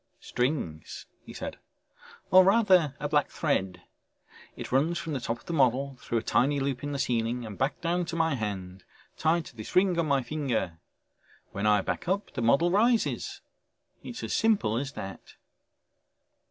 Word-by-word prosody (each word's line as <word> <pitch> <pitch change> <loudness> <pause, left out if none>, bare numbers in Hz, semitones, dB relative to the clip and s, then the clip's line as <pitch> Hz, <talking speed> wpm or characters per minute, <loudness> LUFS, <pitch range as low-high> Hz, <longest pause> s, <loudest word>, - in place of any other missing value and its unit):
"Strings!" 125 - -3 0.2
he - - -11
said. - - -6 0.7
"Or 185 0 +9
rather 185 - +4
a 145 - -2
black 145 -1 +2
thread. 95 - -1 0.7
It - - -7
runs 155 +7 +2
from 160 -1 -4
the 135 - -1
top 120 -1 -3
of - - -22
the 170 - -4
model, 135 -1 +2
through 115 - -2
a 115 - -1
tiny 140 +5 +2
loop 135 -1 -2
in 145 - -3
the 140 - -2
ceiling, 120 -1 -1
and 105 -2 -7
back 135 - -1
down 175 +1 0
to 170 0 -5
my 165 -2 +2
hand 95 -6 -5 0.3
tied 160 +1 +1
to - - -13
this 110 -2 -8
ring 185 -2 +4
on 165 - +1
my 140 -2 +2
finger. 120 - -2 0.7
When 100 +2 -1
I 105 -1 +4
back - - -4
up 195 +3 -1
the 125 - -3
model 140 +9 +3
rises. 230 +4 +1 0.6
It's 240 - -7
as - - -3
simple 210 - +2
as 135 +4 -3
that." 95 0 -8
140 Hz, 175 wpm, -28 LUFS, 115-170 Hz, 0.7 s, Or